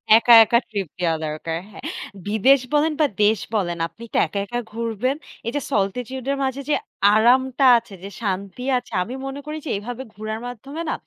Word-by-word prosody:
একা, 235 +1 +6
একা 235 +2 +3
ট্রিপ 200 -4 -3
দেওয়া 170 -2 +1
দরকার। 155 +2 -3
হ্যাঁ, 215 - -12 0.4
বিদেশ 220 +7 +4
বলেন 300 +2 +3
বা - - +6 0.2
দেশ 210 0 +4 0.2
বলেন। 175 -5 0
আপনি 230 - -14
তো - - +1
একা, 200 - -4
একা 240 +3 -3
ঘুরবেন। 230 +3 -1 0.3
এই - - 0
যে 290 - 0
solitude 245 +6 -2
এর 280 - -1
মাঝে 265 +1 -2
যে - - +4 0.4
আরামটা 255 +5 +4
আছে, 225 - -7
যে 195 - -6
শান্তি 200 +2 -3
আছে। 245 - -7
আমি 230 +7 -7
মনে 270 +1 -5
করি 305 +1 -5
যে, - - -4
এভাবে 245 +5 -6
ঘুরার 215 +1 -5
মাধ্যমে 270 +6 -7
না - - 0
230 Hz, 190 wpm, -22 LUFS, 205-265 Hz, 0.4 s, একা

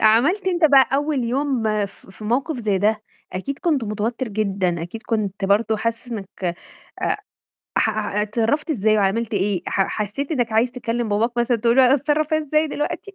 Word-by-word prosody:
عملت 280 - +4
أنت 345 -3 +1
بقى 275 -3 +6
أول 285 -2 0
يوم 265 +1 0 0.2
في 195 - -17
في 215 - -11
موقِف 265 +8 0
زي 210 -4 0
ده، 215 +2 +1 0.3
أكيد 270 +10 -4
كنت 300 -8 +1
متوتّر 225 +4 -2
جدًا، 195 -5 -1
أكيد 200 +7 -7
كنت 205 -3 -2
برضه 215 +3 +2
حاسس 230 +2 -3
إنّك 190 -4 -4 0.5
أ - - +1 0.6
ح - - +3
أع 210 -1 -1
اتصرّفت 230 +9 0
إزاي 215 -6 +2
وعملت 215 +3 0
إيه 195 -2 0
ح 195 - +2
حسّيت 215 - -3
إنّك 245 -6 0
عايز 225 +3 +3
تكلّم 240 -2 -2
باباك 215 +3 +1
مثلًا 240 0 +2
تقولوا 245 +3 +5
اتصرّف 295 +3 +1
إزاي 310 0 +1
دلوقتي 310 +7 -4
230 Hz, 170 wpm, -22 LUFS, 210-275 Hz, 0.6 s, بقى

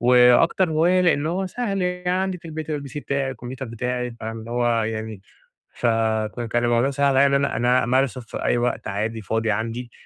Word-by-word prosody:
وأكتر 125 +9 +5
هواية 170 +4 +3
لأن 165 -5 +2
هو 185 +4 -1
سهل 195 -1 -2
يعني، 180 0 -2
عندي 190 -1 -2
في - - -28
البيت 160 -1 -6
الPC 140 -2 -5
بتاعي، 140 -2 -2
الكمبيوتر 130 +1 -7
بتاعي، 125 +1 -3
فاهم؟ 110 +1 -5
اللي 110 +1 -9
هو 120 -1 +1
يعني 110 -1 -4 0.6
فك 115 0 0
كان 120 0 +1
الموضوع 120 +2 +2
سهل 140 -1 +1
عليَّ 140 - +6
إن 140 - +2
أنا - - -3
أنا 125 +2 +3
أمارسه 130 +1 +1
في 115 - -7
أي - - +2
وقت 120 +1 -1
عادي 110 +3 -3
فاضي 110 +2 -1
عندي، 115 +3 -3
125 Hz, 190 wpm, -23 LUFS, 115-150 Hz, 0.6 s, عليَّ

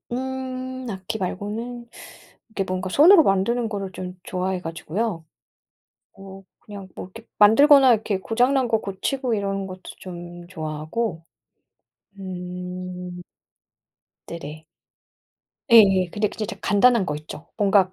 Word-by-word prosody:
음 260 0 -4
악기 190 +2 -5
말고는 225 +6 -5 0.6
이렇게 200 -3 -3
뭔가 185 0 -3
손으로 330 - +7
만드는 225 +3 +1
거를 195 -3 -5
좀 180 0 -7
좋아해 185 0 -2
가지고요. 165 +2 -3 0.9
어 195 0 -11 0.2
그냥 200 -2 -10
뭐 - - -6
이렇게 225 0 -12
만들거나 265 +4 +7
이렇게 210 -3 -1
고장난 250 +5 +1
거 225 -1 +2
고치고 240 +6 -2
이러는 195 -1 -2
것도 185 0 -9 0.2
좀 175 -1 -9
좋아하고. 160 +3 -4 1.0
음. 180 -1 -7 1.1
네네. 155 -1 -8 1.1
예예. 195 -5 +7
근데 210 +2 0
진짜 215 - -5
이제 220 - -6
간단한 215 +1 +4
거 150 - -3
있죠. 155 +2 -10
뭔가 195 -2 +3
195 Hz, 260 characters per minute, -23 LUFS, 180-230 Hz, 1.1 s, 손으로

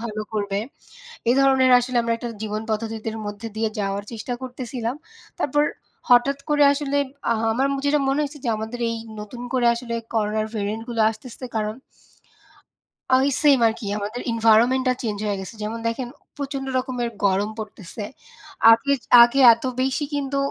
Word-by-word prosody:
ভালো 215 -2 -4
করবে। 200 -2 -1 0.7
এ - - +6
ধরনের 265 -1 +4
আসলে 245 0 -2
আমরা 230 0 0
একটা 240 +1 -5
জীবন 215 0 -3
পদ্ধতিদের 220 0 -3
মধ্যে 205 +2 -6
দিয়ে 220 0 0
যাওয়ার 200 0 -2
চেষ্টা 230 +2 -4
করতেছিলাম। 250 -1 -4 0.4
তারপর 295 +1 +2 0.5
হঠাৎ 250 +3 +5
করে 295 -1 +4
আসলে 285 0 -1 0.3
আহা 225 0 0
আমার 265 +4 +1 0.2
যেটা 290 +1 +3
মনে 270 +2 +1
হয়েছে 295 0 -4
যে 235 - +1
আমাদের 220 +3 -5
এই 230 - -3 0.2
নতুন 210 +4 -8
করে 245 -2 +3
আসলে 235 -1 -4 0.2
করোনার 215 0 0
ভেরিয়ান্ট 215 +2 -3
গুলো 230 -2 0
আসতেছে 240 +3 -10
কারণ 215 0 -1 1.4
ওই 265 +2 +2
সেইম 285 -4 +5
আরকি 225 0 -3
আমাদের 215 +4 -4
এনভায়রনমেন্ট 230 +3 +4
টা 255 - +4
চেঞ্জ 215 -4 -2
হয়ে 205 -2 -1
গেছে। 190 +4 -9
যেমন 220 +2 -4
দেখেন 240 +2 -2
অম - - -39
প্রচণ্ড 275 -1 -4
রকমের 250 -2 -2 0.2
গরম 200 +2 +2
পড়তেছে। 210 -1 -7 0.7
আগে, 230 +5 +3 0.3
আগে 240 +3 +2
এত 230 - -8 0.2
বেশি 265 +3 0
কিন্তু 280 -1 -2
235 Hz, 160 wpm, -23 LUFS, 215-260 Hz, 1.4 s, এ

